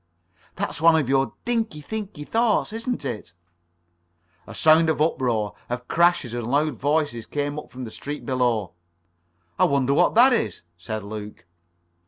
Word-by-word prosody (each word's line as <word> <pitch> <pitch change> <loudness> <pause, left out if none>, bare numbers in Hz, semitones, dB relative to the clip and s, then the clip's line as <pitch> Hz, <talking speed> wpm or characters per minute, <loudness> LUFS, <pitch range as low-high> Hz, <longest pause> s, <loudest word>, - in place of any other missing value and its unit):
"That's - - -3
one 165 0 +6
of 150 -5 +1
your 135 0 +1
dinky, 230 -9 -1
thinky 195 -3 -6
thoughts, 225 -2 +1
isn't 230 - -3
it?" 110 -9 -5 1.1
[Pg - - -9
36]A - - -11
sound 160 +1 +5
of 160 - 0
uproar, 120 -9 0 0.2
of 125 0 -4
crashes 170 -8 +2
and 120 -2 -3
loud 150 +4 +1
voices, 145 -5 -1
came 145 0 -2
up - - -12
from 130 +1 -7
the 115 - -7
street 145 +5 -7
below. 120 -8 0 0.9
"I - - +6
wonder 140 -1 +2
what 145 - +3
that 250 +3 +7
is?" 105 - -1
said 105 +5 -5
Luke. 105 -2 -8
145 Hz, 160 wpm, -24 LUFS, 120-165 Hz, 1.1 s, that